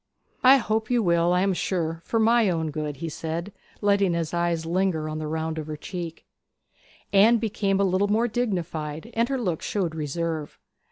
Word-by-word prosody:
'I 260 +2 +8
hope 220 -2 -1
you 245 -2 +2
will, 170 -1 +3
I 180 0 +3
am 195 0 +2
sure, 165 -3 -2
for 230 - 0
my 225 -1 +4
own 160 -3 -1
good,' 150 -2 -4
said 165 +5 -4
he, 195 - -38 0.2
letting 200 -3 +3
his 165 -1 -2
eyes 170 -1 0
linger 170 -2 0
on 155 0 -4
the 155 - -4
round 160 +1 -2
of 155 - -6
her 155 -1 -5
cheek. 170 0 -7 0.9
Anne 215 +4 +6
became 200 -3 0
a - - +3
little 190 +1 +2
more 220 +4 +2
dignified, 175 -6 -3
and 230 +2 +1
her 270 - 0
look 180 -9 -2
showed 185 -6 -1
reserve. 160 0 -3
175 Hz, 185 wpm, -25 LUFS, 160-210 Hz, 0.9 s, I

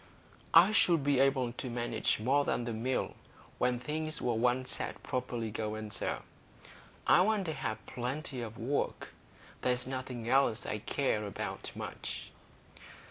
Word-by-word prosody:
"I 175 +5 +9
should 170 -8 +4
be 140 -2 +3
able 135 -3 +3
to 125 - -5
manage 120 -2 0
more 135 +6 +3
than 120 - 0
the 120 -1 -3
Mill 125 +4 -1 0.5
when 125 0 +2
things 155 +4 -2
were 120 - +1
once 125 +3 +1
set - - -3
properly 120 -3 -2
going, 110 0 -3
sir. - - -2 0.8
I - - +7
want 205 0 +2
to 160 - -1
have 110 -6 -4
plenty 130 +1 -3
of 115 -1 -6
work. 130 +5 -1 0.5
There's 125 0 +1
nothing 130 -3 -4
else 135 -3 +3
I 105 - -2
care 110 -2 0
about 100 - -4
much." - - -6
125 Hz, 145 wpm, -32 LUFS, 115-140 Hz, 0.8 s, I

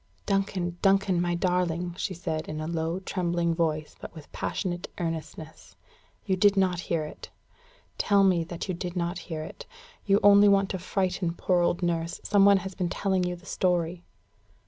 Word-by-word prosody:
"Duncan, 190 -3 -1
Duncan, 195 -2 +3
my 175 0 0
darling!" 180 -1 0
she 185 0 -3
said, 160 -2 -3
in 155 0 -4
a 155 - -3
low, 165 +2 -2
trembling 175 -3 -1
voice, 155 -2 -1
but - - -9
with 155 -2 -12
passionate 175 -3 -3
earnestness, 160 -1 -6 0.5
"you 190 - +1
did 200 +1 +4
not 185 -2 +2
hear 165 -2 -1
it? 150 - -10 0.7
Tell 200 -1 +4
me 180 -3 +3
that 170 +2 -6
you 185 - -1
did 175 0 -5
not 175 +1 -2
hear 155 -2 -3
it! - - -10 0.4
You 200 0 +4
only 205 0 +7
want 195 -1 +3
to 190 - -3
frighten 180 -1 -1
poor 180 0 +1
old 175 +1 +1
nurse: 170 -1 -1
some 200 -1 +4
one 200 0 +7
has 190 - -5
been 180 -2 -2
telling 190 -1 0
you 180 0 -2
the 175 +1 -16
story!" 175 -2 0
175 Hz, 180 wpm, -27 LUFS, 170-190 Hz, 0.7 s, only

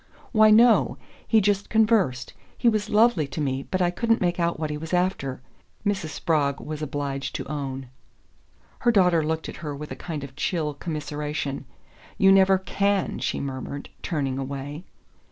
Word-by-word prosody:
"Why, 215 -2 +6
no 225 +2 +5 0.3
he 225 - +5
just 200 0 +1
conversed. 215 - +2 0.2
He 240 - +1
was 215 -2 +2
lovely 210 -8 +4
to 140 - -6
me, 135 -2 -2
but 185 -1 +1
I 175 - +2
couldn't 230 +4 +1
make 175 -1 0
out 170 -2 0
what 155 -1 -2
he 150 - -3
was 160 +3 -2
after," 175 -8 -1 0.4
Mrs. 200 -5 0
Spragg 145 -3 0
was 155 0 -6
obliged 140 -2 -3
to - - -4
own. 135 -3 -4 0.9
Her 240 - +3
daughter 180 -6 +4
looked 160 +1 -2
at - - -7
her 150 -3 -5
with 150 +1 -8
a - - -4
kind 155 -5 -6
of 135 -1 -9
chill 155 0 -1
commiseration. 150 -2 -4 0.5
"You 195 0 +6
never 195 0 +6
CAN," 195 +1 0
she - - -2
murmured, 140 +1 -5
turning 135 -5 -2
away. 140 +4 -5
160 Hz, 170 wpm, -25 LUFS, 140-195 Hz, 0.9 s, Why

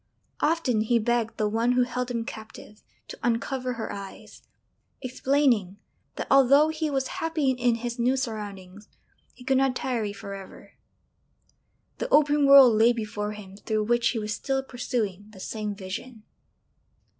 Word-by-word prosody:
Often 295 -9 +1
he 235 +1 +3
begged 230 0 0
the 215 - +1
one 230 +3 +1
who 250 0 +3
held 250 0 -3
him 235 -2 -3
captive 220 -1 -10 0.3
to - - -10
uncover 250 +2 -1
her 230 -2 -5
eyes, 200 -1 -10 0.6
explaining 255 -7 +1 0.4
that - - -4
although 275 +3 +6
he 315 0 -2
was 270 -2 -1 0.2
happy 320 -4 +1
in 245 -2 +1
his 240 +1 -5
new 250 +3 +2
surroundings 205 -5 -6 0.5
he 250 - -14
could 265 +1 +2
not 270 -1 +1
tarry 235 -6 -2
for 200 0 -8
ever; 195 -1 -11 1.3
the - - -3
open 295 - +4
world 275 -4 +9
lay 230 +2 +6
before 210 -2 -4
him 195 -2 -11
through 215 0 -1
which 240 +2 +2
he 240 - -2
was 215 -1 -3
still 270 +2 -2
pursuing 225 -6 -3
the 205 -3 -15
same 210 +1 -4
vision. 210 +4 -8
240 Hz, 155 wpm, -26 LUFS, 210-265 Hz, 1.3 s, world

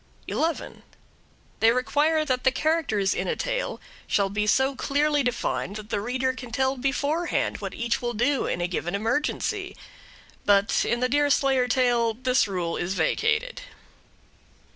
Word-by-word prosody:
11. 330 +1 -2 0.8
They 225 - +5
require 295 +6 +2
that 255 -2 -1
the 260 - +5
characters 265 -9 0
in - - -2
a 485 - 0
tale - - -2 0.3
shall 195 -1 +1
be 210 +1 -1
so 265 +5 +2
clearly 290 +3 +1
defined 240 -5 -2
that 215 0 -8
the 200 - 0
reader 255 +3 -1
can 255 -2 -9
tell 265 +3 +1
beforehand 285 +6 -1
what - - -6
each 235 0 -1
will 240 -1 -2
do 265 +5 +1
in 175 - -2
a 175 - 0
given 175 +1 -3
emergency. 295 - -1 0.7
But 200 +1 +3
in 240 +1 0
the 255 - +3
Deerslayer 275 -2 +2
tale 240 -2 +2
this 255 0 +2
rule 180 -4 -2
is 180 +2 -2
vacated. 445 - 0
255 Hz, 150 wpm, -25 LUFS, 220-290 Hz, 0.8 s, They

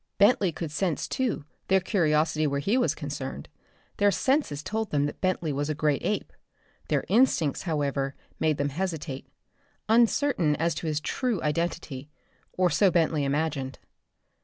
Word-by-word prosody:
Bentley 200 -3 +4
could 160 -1 -5
sense 165 0 -1
too 245 - -1 0.2
their 190 0 +4
curiosity 155 -5 +2
where 140 0 0
he 200 +11 +1
was 255 -1 +2
concerned. - - -5 0.5
Their 205 0 +4
senses 200 - +1
told 220 +2 -2
them 145 -1 +1
that 145 - -5
Bentley 180 -5 0
was 145 +2 -2
a 155 - -1
great 150 -1 +1
ape. 210 - -2 0.5
Their - - 0
instincts, 205 - +3
however, 140 -3 -1 0.2
made 155 -2 +2
them 145 0 0
hesitate, 150 -4 -4 0.6
uncertain 225 - +3
as 165 +3 0
to 160 - -4
his 155 -1 -1
true 245 - -1
"identity" 150 -3 -2 0.4
or 180 -2 +2
so 195 +6 +4
Bentley 160 -4 +2
imagined. 140 -2 -1
160 Hz, 150 wpm, -27 LUFS, 145-195 Hz, 0.6 s, Bentley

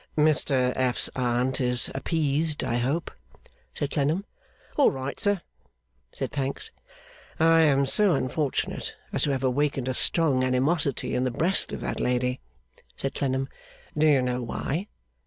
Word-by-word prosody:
'Mr 140 -4 +3
F.'s 130 -1 +1
Aunt 125 +1 0
is 125 -1 +2
appeased, 150 +1 0
I 120 - 0
hope?' 135 +8 -1 0.6
said 145 -1 -3
Clennam. 155 +7 0 0.5
'All 285 - +5
right, 135 +1 -5
sir,' 205 -4 +2 0.7
said - - -4
Pancks. 135 -1 -3 0.7
'I 165 +1 +5
am 140 -3 +4
so 190 +5 +3
unfortunate 135 +2 -2 0.2
as - - +1
to 145 - 0
have 135 -1 -2
awakened 135 0 0
a 130 - 0
strong 140 -1 +2
animosity 135 +3 +1
in 125 - +1
the 130 - +1
breast 170 +10 +1
of - - -5
that - - -3
lady,' 125 +1 0 0.6
said 135 - -3
Clennam. 135 -1 -1 0.5
'Do 155 +1 +3
you 140 -4 +4
know 125 0 -1
why? 155 - -3
135 Hz, 145 wpm, -26 LUFS, 130-155 Hz, 0.7 s, All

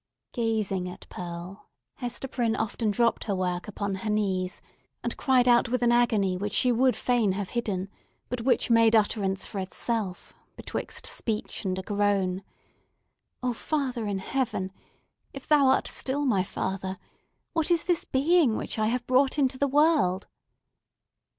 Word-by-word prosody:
Gazing 215 -6 -1
at 180 - -11
Pearl, 175 +2 -8 0.3
Hester 245 +1 -4
Prynne 235 -3 0
often 220 0 -1
dropped 230 +3 +1
her 200 - -1
work 180 0 -2
upon 200 -1 -3
her 220 - -2
knees, 190 -3 0 0.4
and - - -2
cried 255 -3 +3
out 240 0 +5
with 250 0 0
an 240 - +4
agony 220 -6 +3
which 200 +2 -3
she 250 - +3
would 250 +2 +3
fain 235 -6 +1
have 195 0 -3
hidden, 200 -6 -2 0.4
but 250 -1 -3
which 250 0 +2
made 230 -1 +6
utterance 200 -3 +1
for 200 - -5
itself 195 0 -3 0.2
betwixt - - -5
speech 215 -2 -3
and 185 -1 -1
a 190 - -4
groan—"O 200 +4 -3
Father 255 -4 -2
in 200 -1 -1
Heaven—if 215 +3 -5
Thou 295 -3 +5
art 265 - +3
still 285 +2 -2
my 200 -8 +2
Father—what 190 - -5
is 340 -2 +3
this 350 -2 +1
being 285 -2 +3
which - - -4
I 215 - +2
have 245 +1 -1
brought 260 +2 +3
into 265 -2 +1
the 280 - +3
world?" 285 - +3
225 Hz, 150 wpm, -27 LUFS, 195-255 Hz, 0.4 s, made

